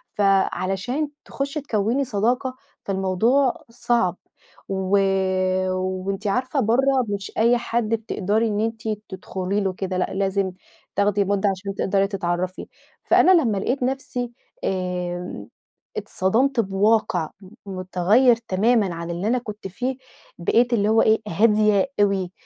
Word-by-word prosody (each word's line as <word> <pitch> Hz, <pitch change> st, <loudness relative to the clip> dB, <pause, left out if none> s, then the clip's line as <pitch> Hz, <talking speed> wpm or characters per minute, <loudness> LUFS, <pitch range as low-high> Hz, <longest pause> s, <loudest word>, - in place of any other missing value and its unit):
فعلشان 195 Hz, -, +1 dB, 0.2 s
تخُشي 280 Hz, +2 st, -3 dB
تكوّني 235 Hz, +1 st, 0 dB
صداقة، 250 Hz, +3 st, 0 dB, 0.3 s
فالموضوع 200 Hz, +8 st, +1 dB
صعب. 230 Hz, -6 st, 0 dB, 0.5 s
و 190 Hz, 0 st, +1 dB, 0.7 s
وأنتِ 185 Hz, +2 st, -2 dB
عارفة 255 Hz, +6 st, 0 dB
برّه 260 Hz, +3 st, +3 dB
مش 200 Hz, -1 st, -4 dB
أي 235 Hz, +2 st, +4 dB
حد 235 Hz, -2 st, -1 dB
بتقدري 220 Hz, -1 st, 0 dB
إن 210 Hz, -1 st, -1 dB
أنتِ 225 Hz, 0 st, -2 dB, 0.3 s
تدخلي 190 Hz, +1 st, -3 dB
له 190 Hz, -2 st, -1 dB
كده، 185 Hz, 0 st, -3 dB
لأ 180 Hz, -, -1 dB
لازم 195 Hz, 0 st, 0 dB, 0.4 s
تاخدي 200 Hz, 0 st, +2 dB
مُدّة 200 Hz, +1 st, +1 dB
عشان 195 Hz, +1 st, -4 dB
تقدري 195 Hz, 0 st, +1 dB
تتعرّفي، 185 Hz, -2 st, -3 dB, 0.4 s
فأنا 375 Hz, -, +5 dB
لمّا 220 Hz, -7 st, 0 dB
لقيت 250 Hz, +7 st, -1 dB
نفسي 250 Hz, -2 st, -2 dB, 0.3 s
آمم، 180 Hz, -, -3 dB, 0.5 s
اتصدمت 235 Hz, +7 st, +1 dB
بواقع 200 Hz, -4 st, +2 dB
م 190 Hz, -, -13 dB, 0.2 s
مُتغيّر 195 Hz, +6 st, +3 dB
تمامًا 215 Hz, -3 st, +1 dB
عن 170 Hz, +1 st, -5 dB
اللي 175 Hz, +4 st, -3 dB
أنا 250 Hz, +3 st, +2 dB
كنت 210 Hz, -4 st, -6 dB
فيه، 250 Hz, +7 st, -3 dB, 0.4 s
بقيت 240 Hz, +8 st, +2 dB
اللي 210 Hz, -2 st, +2 dB
هو 225 Hz, +1 st, +5 dB
إيه، 220 Hz, 0 st, +3 dB
هادية 210 Hz, +3 st, +3 dB
أوي، 195 Hz, -3 st, +1 dB
205 Hz, 125 wpm, -23 LUFS, 190-235 Hz, 0.7 s, فأنا